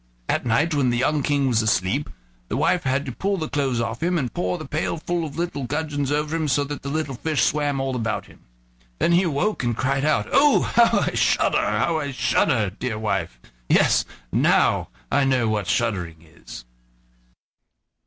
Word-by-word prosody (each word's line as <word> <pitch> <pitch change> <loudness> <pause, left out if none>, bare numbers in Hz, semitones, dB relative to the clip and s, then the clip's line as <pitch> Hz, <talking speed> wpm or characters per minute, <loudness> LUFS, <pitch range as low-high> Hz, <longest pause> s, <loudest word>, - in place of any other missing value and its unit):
At - - -1
night, 145 +9 +2
when 140 -4 +2
the 120 - 0
young 145 +4 +1
King 140 0 +1
was 115 -3 +2
asleep, 110 +5 0 0.4
his 115 - -2
wife 165 +3 +1
had 135 +2 0
to 130 - -4
pull 195 +10 -2
the 160 -3 -3
clothes 135 -5 -1
off 115 -1 -3
him, 175 +1 +1
and 130 -7 -2
pour 180 0 -1
the 155 - -8
pail 155 +2 -2
full 170 +1 -2
of 155 -2 -7
little 165 -6 -3
gudgeons 145 0 -2
over 150 +2 -1
him, 160 -2 -1
so 145 +1 +2
that 145 0 -6
the 140 - -5
little 155 -1 -2
fish 140 -1 -1
swam 145 -1 0
all 135 -1 -2
about 115 -3 -2
him. - - -18 0.6
Then - - +1
he 170 +1 +5
awoke 175 +2 -1
and 120 -2 -1
cried 135 +1 0
out: 155 0 +1
"Oh! 285 0 +5
how 235 0 +3
I - - 0
shudder, - - +2
how 165 -2 0
I 145 -2 -3
shudder, 120 -4 +1
dear 110 +2 -4
wife! 95 - -2 0.3
Yes, - - +4 0.3
now - - +2 0.2
I 145 - +3
know 130 -3 +2
what 105 -3 -1
shuddering 90 -9 -1
is." 80 -7 -12
140 Hz, 195 wpm, -23 LUFS, 120-155 Hz, 0.6 s, he